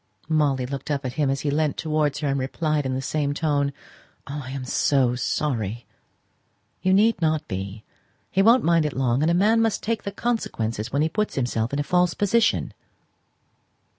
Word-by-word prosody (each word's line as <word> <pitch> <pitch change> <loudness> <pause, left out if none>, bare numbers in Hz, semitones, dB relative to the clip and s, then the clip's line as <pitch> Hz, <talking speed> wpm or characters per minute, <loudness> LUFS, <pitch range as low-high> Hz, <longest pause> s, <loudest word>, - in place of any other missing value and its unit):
Molly 145 -5 +2
looked 135 +3 -6
up 140 -2 -1
at 125 - -3
him 145 -1 0
as 135 +1 -1
he 145 - -1
leant 150 0 0
towards 155 -3 0
her, 150 - -1
and 140 0 0
replied 150 +2 -1
in 130 - -2
the 130 - -3
same 145 0 -1
tone 145 -3 +1 0.5
"Oh, 145 +1 -5
I 130 - -8
am 135 -1 -5
so 130 -1 +2
sorry!" 120 -4 -2 1.0
"You 185 - +2
need 210 0 +3
not 155 -1 +1
be. 100 +2 -5 0.5
He 190 - +3
won't 230 +4 +5
mind 170 -1 +3
it 150 -3 -2
long; 130 0 +1
and 155 - +2
a 170 - +3
man 215 +5 +4
must 225 -2 0
take 230 0 -1
the 200 - -5
consequences 115 - -2
when 140 +2 +1
he - - +2
puts 210 +6 -2
himself 120 -3 -1
in 140 - -2
a 145 - 0
false 180 +3 +2
position." 220 +3 +1
145 Hz, 195 wpm, -24 LUFS, 130-170 Hz, 1.0 s, won't